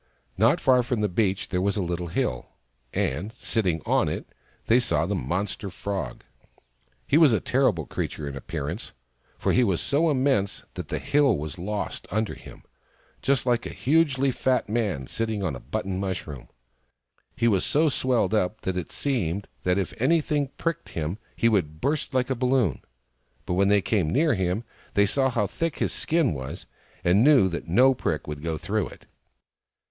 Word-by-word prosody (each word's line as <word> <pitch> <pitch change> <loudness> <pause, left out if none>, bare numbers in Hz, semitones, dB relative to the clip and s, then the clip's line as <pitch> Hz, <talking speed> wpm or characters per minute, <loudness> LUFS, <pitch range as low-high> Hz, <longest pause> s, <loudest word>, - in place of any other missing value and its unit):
Not - - +4
far 130 -1 +4
from 120 -2 -1
the 105 - +2
beach 95 0 0
there 90 - 0
was 100 +2 +1
a - - +1
little 85 0 -3
hill; 60 -6 -2 0.4
and, 90 +12 -1
sitting 90 -11 -1
on - - +2
it, - - -4 0.4
they 120 +2 +5
saw 120 -8 +1
the 100 - -1
monster 95 - -2
Frog. 100 +1 -4 0.8
He 150 - +4
was 155 -5 +7
a 110 - +3
terrible 125 - +1
creature 75 - -4
in 70 - -5
appearance, 75 - -5 0.4
for - - 0
he 125 - +4
was 95 -7 +1
so 160 +4 +2
immense 130 -8 +1
that - - -6
the - - -2
hill 140 -8 +3
was 75 +2 -6
lost 105 +3 -4
under 110 +2 -1
him, - - -13 0.6
just 135 -2 +1
like 120 -1 +1
a - - -6
hugely 140 -2 +2
fat 130 0 +1
man 105 - -1
sitting 110 - -2
on 80 -8 -1
a - - -7
button 95 +7 -3
mushroom. 90 -8 -4 0.9
He 115 - +2
was 100 -5 +3
so 155 +2 +3
swelled 130 -5 +1
up 105 0 0
that 95 -1 -2
it 90 - -4
seemed 100 - -1
that 90 +1 +1
if 95 -3 -2
any 165 +6 +4
thing 145 -2 -1
pricked 165 0 -2
him 80 +6 -3 0.2
he 115 - +2
would 80 -9 +1
burst 145 - -1
like 130 0 0
a - - +1
balloon; 125 - +1 0.6
but - - -2
when 95 +2 +3
they 100 -1 +4
came 95 -6 +1
near 150 - +3
him 95 +2 -1 0.3
they 100 - +5
saw 130 +6 +2
how 115 -4 +1
thick 165 - -3
his - - 0
skin 160 - +1
was, 65 -2 -6 0.4
and 95 +5 +4
knew 140 -8 +6
that 85 - -5
no 125 +10 +5
prick 80 -10 -2
would 75 -1 -6
go 80 0 -2
through 105 +2 -1
it. - - -14
105 Hz, 185 wpm, -26 LUFS, 90-130 Hz, 0.9 s, was